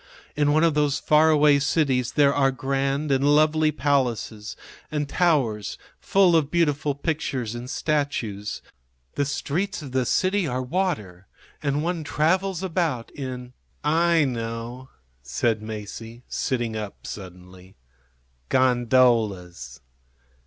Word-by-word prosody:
In 145 0 +2
one 155 +2 +3
of 165 -2 +4
those 150 -1 +1
far 155 +1 +4
away 150 -2 +5
cities 135 -4 +1
there 140 -2 +4
are 135 -1 +3
grand 135 +3 -1
and 135 0 +2
lovely 155 0 +3
palaces 125 -7 -1 0.4
and 150 -1 -1
towers 135 - +1 0.2
full 190 -3 +3
of 155 -3 +2
beautiful 150 -4 +1
pictures 140 -6 -2
and 120 +1 -7
statues. 135 -10 -2 0.5
The 145 - 0
streets 155 +6 -2
of 135 - -8
the 130 -1 0
city 190 - +1
are 130 -1 -2
water, 115 - -2 0.3
and 145 0 0
one 170 -1 -2
travels 180 +5 0
about 165 -10 -1
in 125 -2 -7 0.2
" - - -41 0.3
"I 165 -3 +4
know," 120 +1 -5 0.3
said 105 - -1
Masie, 110 +2 -8
sitting 120 -3 -2
up 105 -2 -6
suddenly. 90 -1 -10 0.7
"Gondolas." 115 - +2
135 Hz, 125 wpm, -24 LUFS, 115-155 Hz, 0.7 s, away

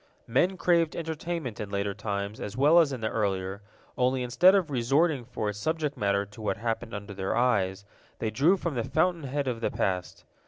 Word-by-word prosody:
Men 175 +11 +1
craved 170 -2 +2
entertainment 160 -6 -4
in 105 - -4
later 100 0 -1
times 100 0 -4
as 105 +3 -6
well 150 +6 +6
as 160 -4 +3
in 130 -4 -5
the 110 - 0
earlier, 95 -2 -2 0.4
only 125 0 +2
instead 175 +11 +5
of 180 -6 +1
resorting 135 +3 +2
for 110 -3 -4
its 105 0 -5
subject 155 +3 -1
matter 100 0 +1
to 105 +2 -13
what 100 -2 -1
happened 115 0 -3
under 100 0 -7
their 95 -1 -2
eyes, 100 -6 +1 0.3
they 110 - -2
drew 150 - +3
from 170 -3 -3
the 120 -3 -1
fountain 165 +3 +1
head 140 +1 -2
of 120 -3 -2
the - - +1
past. 90 -2 -2
120 Hz, 200 wpm, -28 LUFS, 100-155 Hz, 0.4 s, well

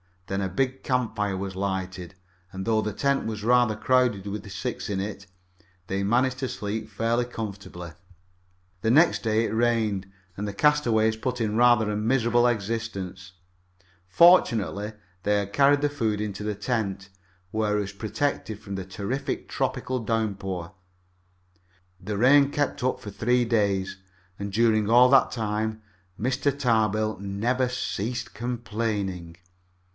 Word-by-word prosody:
Then 95 +1 -2
a 95 - -1
big 130 +7 -1
campfire 110 -6 -1
was 95 0 -4
lighted, 95 -2 -3 0.4
and, 95 0 -5
though 110 -1 +2
the 105 -1 -3
tent 140 +5 0
was 110 -2 -4
rather 120 -1 +4
crowded 120 -2 +2
with 100 0 -5
six 105 +5 -4
in 100 -2 -1
it, 100 -1 -6 0.6
they 95 +1 -1
managed 125 +5 +1
to 130 - -1
sleep 110 -1 -4
fairly 115 +3 0
comfortably. 100 -7 -7 0.9
The 110 - +1
next 160 +3 +4
day 110 0 +2
it - - -3
rained, 110 -4 +1 0.3
and 105 +1 -3
the 100 - -4
castaways 110 -5 +3
put 125 +2 -3
in 110 -1 0
rather 120 -3 +4
a 105 - -1
miserable 120 +1 +2
existence. 100 -4 -3 0.7
Fortunately, 110 - +4 0.3
they 105 0 +2
had 100 0 -5
carried 140 +2 +4
the 145 - +2
food 110 -7 -1
into 105 -1 -4
the 105 -1 -2
tent, 100 -4 -2 0.4
where 105 -1 0
it - - +1
was 100 - -5
protected 110 +1 -2
from 100 -2 -7
the 95 -1 -5
terrific 100 +8 -4
tropical 130 0 -2
downpour. 100 -6 -2 1.3
The 100 +2 -4
rain 140 +5 +5
kept 145 -4 -1
up 130 - 0
for 105 - -7
three 120 +4 +2
days, 100 -5 0 0.4
and 100 0 -4
during 110 0 +2
all 125 +2 +7
that 135 0 +5
time 110 -1 -2 0.4
Mr. 135 +4 0
Tarbill 110 -5 +1
never 115 +6 0
ceased 120 -1 -3
complaining. 105 -6 -3
110 Hz, 145 wpm, -26 LUFS, 100-120 Hz, 1.3 s, all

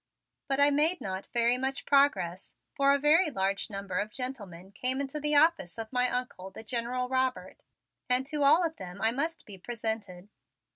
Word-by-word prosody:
But 275 0 0
I 285 0 +5
made 310 +5 +3
not 190 0 -6
very 240 +1 +3
much 265 +1 -3
progress, 275 - +1 0.2
for 275 0 +2
a 280 - +3
very 310 +5 +4
large 195 -5 -2
number 195 -3 -4
of 205 +1 -3
gentlemen 205 -8 -7
came 255 +6 +1
into 280 +2 -4
the 300 0 +2
office 295 - +3
of 225 +2 -7
my 250 0 +2
Uncle, 245 -7 -4
the 190 - -10
General 245 +2 -2
Robert, 260 0 -3 0.5
and 250 +1 +2
to 295 +1 -4
all 310 +5 +5
of 320 -1 -5
them 185 0 -9
I 220 +2 +2
must 320 +7 -3
be 195 -3 -12
presented. 215 -4 -5
250 Hz, 185 wpm, -28 LUFS, 200-280 Hz, 0.5 s, I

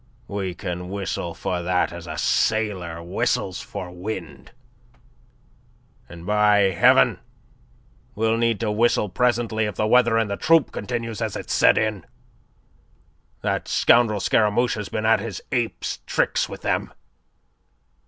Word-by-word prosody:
We 95 -3 -4
can 90 +1 -5
whistle 95 -3 -4
for 90 +1 -3
that 90 +1 0
as - - -9
a - - -6
sailor 95 -7 0
whistles 90 +1 -1
for 90 -1 -7
wind. 90 -5 -7 1.6
And, 85 -1 -11
by 105 -1 +3
Heaven, 85 - +4 1.0
we'll 110 +1 +1
need 115 -2 +1
to 110 -2 0
whistle 110 -1 +2
presently 115 0 0
if 105 - -4
the 110 - 0
weather 120 0 +4
in 115 -2 +1
the 100 -1 -3
troupe 165 -4 +3
continues 115 0 -4
as - - -2
it's - - -4
set - - +5
in. 110 -3 -1 1.4
That - - -1
scoundrel 115 -3 +3
Scaramouche 110 +5 +2
has 105 -4 -5
been 110 +3 -3
at 110 -1 +4
his 105 -1 -5
ape's 120 -3 -2
tricks - - 0
with - - -9
them. - - -1
105 Hz, 135 wpm, -23 LUFS, 90-115 Hz, 1.6 s, set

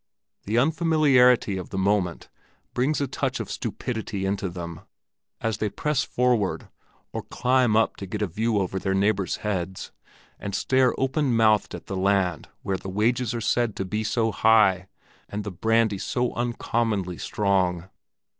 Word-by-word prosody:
The 110 +3 0
unfamiliarity 140 - +4
of 90 - -6
the 95 - -5
moment 95 -3 0 0.5
brings 135 +5 +1
a 140 - +1
touch - - -2
of - - -5
stupidity 110 -5 -4
into 95 -1 -1
them, 85 -2 -7 0.6
as 115 -1 -1
they 105 - 0
press 150 +5 0
forward, 120 -6 0 0.4
or - - -3
climb 125 -3 +1
up 110 0 +2
to 100 - -7
get 105 +3 -3
a - - +3
view 110 +5 -1
over 95 -1 -1
their 95 0 -1
neighbors' 100 -2 +1
heads 95 -2 -3 0.5
and 100 -2 -4
stare 130 +3 +2
open 135 -1 +1
mouthed 110 -2 +3
at - - -10
the 95 - -5
land 95 -3 +1
where 95 -1 -1
the 95 - -8
wages 120 +5 0
are 115 - -3
said 115 0 +1
to 95 - -3
be 105 +3 -2
so 110 +1 0
high, 100 -5 +4 0.4
and 105 +1 -4
the 100 - -5
brandy 110 +2 +1
so 125 -1 -1
uncommonly 115 -6 -1
strong. 95 -4 0
105 Hz, 160 wpm, -25 LUFS, 95-120 Hz, 0.6 s, unfamiliarity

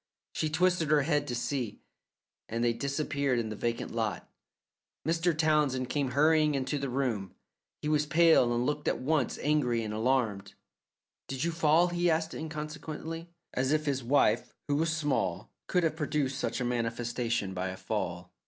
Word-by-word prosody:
She 155 - -1
twisted 175 0 +2
her 150 -2 +4
head 145 -1 +1
to 125 - -2
see, 120 -2 -3 0.7
and 115 +1 -1
they 120 -1 +3
disappeared 140 +1 -1
in 115 -2 -1
the 110 - -4
vacant 115 +2 -2
lot. 110 -6 -2 0.8
Mr. 165 0 +1
Townsend 150 -5 +2
came 140 -3 0
hurrying 155 0 +4
into 135 +2 -1
the 135 -1 -3
room; 120 -7 -2 0.5
he - - -1
was 150 -1 +2
pale, 160 -6 +5
and 120 +1 +1
looked 150 +1 -2
at - - +2
once 145 0 0
angry 125 -6 +2
and 105 -1 -4
alarmed. 110 -3 0 0.7
"Did 135 -1 -3
you 170 - +1
fall?" 165 +1 +4
he 175 0 +1
asked 160 0 0
inconsequently, 160 +1 -6 0.2
as 130 +2 0
if 155 0 +1
his 135 -3 -1
wife, 140 +4 +2
who 145 - +1
was 160 +1 +1
small, 150 -4 -1 0.2
could 180 - +2
have 160 -2 +1
produced 145 -3 -1
such - - -2
a 125 - -1
manifestation 120 -3 -1
by 90 0 -2
a 95 0 -5
fall. - - -4
140 Hz, 170 wpm, -30 LUFS, 120-155 Hz, 0.8 s, pale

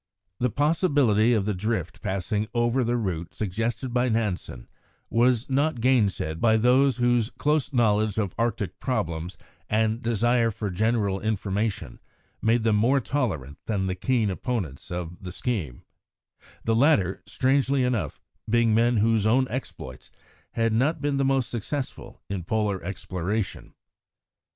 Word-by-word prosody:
The 125 - +2
possibility 145 - +2
of 105 -4 +1
the 105 - 0
drift 95 -2 -3
passing 100 +3 -2
over 120 +2 +2
the 120 +1 0
route 90 -7 -3
suggested 115 +5 -2
by 125 0 +2
Nansen 105 - -2 0.4
was 120 +1 +3
not 140 0 +1
gainsaid 105 -10 +1
by 110 -1 +4
those 125 +3 +4
whose 120 -2 +2
close 150 -1 +1
knowledge 110 -4 +2
of 100 -4 -1
Arctic 105 -5 -2
problems, 85 - -2 0.3
and 110 +2 +1
desire 120 +1 +2
for 105 -2 -4
general 105 0 +1
information, 105 - -2 0.4
made 115 +1 +2
them 110 -2 +3
more 125 +6 +3
tolerant 95 - -2
than 100 -4 0
the 95 - -1
keen 110 +1 0
opponents 95 - -4
of 90 -1 -5
the 90 -2 -7
scheme 90 - -3 0.8
the 115 - +1
latter, 110 - +3
strangely 135 0 +1
enough, 115 - -1 0.3
being 115 0 +3
men 120 +1 +3
whose 110 0 +2
own 130 +4 +4
exploits 90 - -7 0.4
had 115 -1 +1
not 135 +8 +1
been 145 -1 0
the 135 - +2
most 135 -2 +1
successful 130 +4 -5
in 95 -3 -4
Polar 105 0 -1
exploration. 95 +2 -4
110 Hz, 140 wpm, -25 LUFS, 100-125 Hz, 0.8 s, by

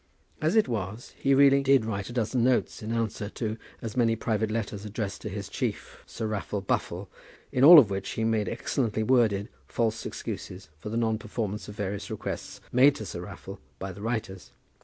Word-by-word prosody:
As 160 +6 +2
it 220 - +5
was, 110 0 -4
he 135 0 +2
really 140 0 +6
did 135 -4 +4
write 100 -2 -3
a - - -7
dozen 120 0 0
notes 125 -1 +1
in 110 +1 -4
answer 110 -3 -2
to 110 -2 -2 0.3
as 110 -2 -5
many 115 -2 +3
private 110 -1 -1
letters 110 -2 -3
addressed 105 -1 -4
to 105 - -5
his 100 0 -5
chief, - - -4
Sir 110 - -5
Raffle 105 -1 -2
Buffle, 95 - -2 0.4
in 125 - +1
all 165 +4 +12
of 115 -9 +7
which 95 0 -3
he 115 - -2
made 110 -3 +1
excellently 110 -5 -1
worded 110 -4 +3 0.2
false 110 -1 -1
excuses 95 +1 -6
for 95 - -6
the 115 - -2
non 110 -2 +1
performance 105 -2 -4
of 105 - -8
various 100 -2 -4
requests - - -5
made 135 +3 +6
to - - -6
Sir 85 - -6
Raffle 90 - -9 0.2
by 95 0 -5
the 95 +2 -10
writers. 110 -5 -4
110 Hz, 195 wpm, -28 LUFS, 100-120 Hz, 0.4 s, all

